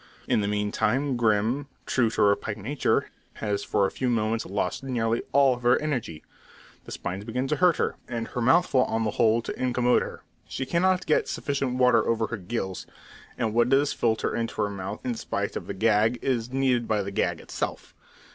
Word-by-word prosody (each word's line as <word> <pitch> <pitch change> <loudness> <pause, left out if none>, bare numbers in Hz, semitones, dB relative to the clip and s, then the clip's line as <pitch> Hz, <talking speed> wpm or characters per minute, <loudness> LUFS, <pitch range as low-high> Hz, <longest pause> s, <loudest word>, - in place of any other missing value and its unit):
In - - +2
the 100 - -1
meantime 105 +7 0
Grim, 115 +4 +1 0.2
true 120 -3 +2
to - - +1
her 100 0 +5
pike 105 0 -5
nature, 130 +8 0 0.2
has 105 -2 -2
for 100 - +1
a - - -1
few 130 - -2
moments 115 -1 0
lost 95 -2 -2
nearly 115 -3 0
all 135 -2 +4
her 120 0 +3
energy. 125 - -3 0.6
The - - -10
spines 95 +3 -4
begin 125 +4 -2
to 150 - +1
hurt 180 -2 +4
her, - - -1
and 115 -1 -4
her 120 - -3
mouthful 130 0 +4
on 110 0 -1
the 110 - 0
whole 110 +2 +2
to - - -4
incommode 125 -1 +2
her. - - -7 0.2
She 135 - -4
cannot 180 +5 +1
get 155 - +2
sufficient 135 -3 -2
water 125 -3 +4
over 115 -1 +1
her 120 - -4
gills, 95 -1 -4 0.5
and 115 -3 -1
what 120 +1 +3
does 140 +2 +3
filter 110 -2 0
into 115 -1 -3
her 100 - -1
mouth 100 +1 -6
in 125 - 0
spite 115 - -3
of - - -5
the - - -4
gag, 110 +3 +3
is 125 -2 -1
needed 130 -3 +1
by 105 -2 +1
the 100 - -5
gag - - 0
itself. - - -5
115 Hz, 195 wpm, -26 LUFS, 105-130 Hz, 0.6 s, her